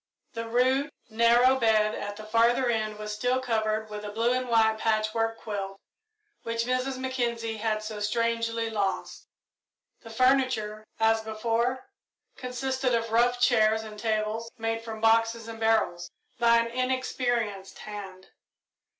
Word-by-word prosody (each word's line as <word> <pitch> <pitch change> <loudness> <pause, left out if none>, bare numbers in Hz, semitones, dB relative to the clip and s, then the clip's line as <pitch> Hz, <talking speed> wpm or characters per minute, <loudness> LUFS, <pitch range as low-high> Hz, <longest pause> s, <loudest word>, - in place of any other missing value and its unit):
The 230 0 -5
rude, 260 +5 +2 0.2
narrow 240 +3 +4
bed 215 -2 +3
at 205 0 -5
the 215 - -9
farther 230 +4 +3
end 215 -2 -2
was 210 0 -5
still 245 +4 0
covered 220 -3 -1
with 210 0 -5
the 210 - -6
blue 230 +4 +1
and 255 0 -2
white 220 -1 +3
patchwork 225 +1 0
quilt 195 -3 -5 0.6
which 230 0 -2
Mrs. 255 +1 -1
Mackenzie 235 -3 -2
had 215 0 -1
so 215 -1 -6
strangely 230 +1 -1
lost. 195 -4 -3 0.7
The 225 - -12
furniture, 225 -4 +1
as 225 0 +3
before, 230 - -1 0.5
consisted 255 0 -1
of 230 -1 -2
rough 245 +2 +3
chairs 220 -2 +3
and 215 -1 -9
tables 220 +1 -1
made 225 0 -2
from 220 -1 -7
boxes 225 0 +2
and 225 -1 -8
barrels 220 -6 +1 0.3
by 235 -1 +5
an 230 - +2
inexperienced 245 -5 -2
hand. 195 -3 -9
225 Hz, 140 wpm, -27 LUFS, 215-240 Hz, 0.7 s, by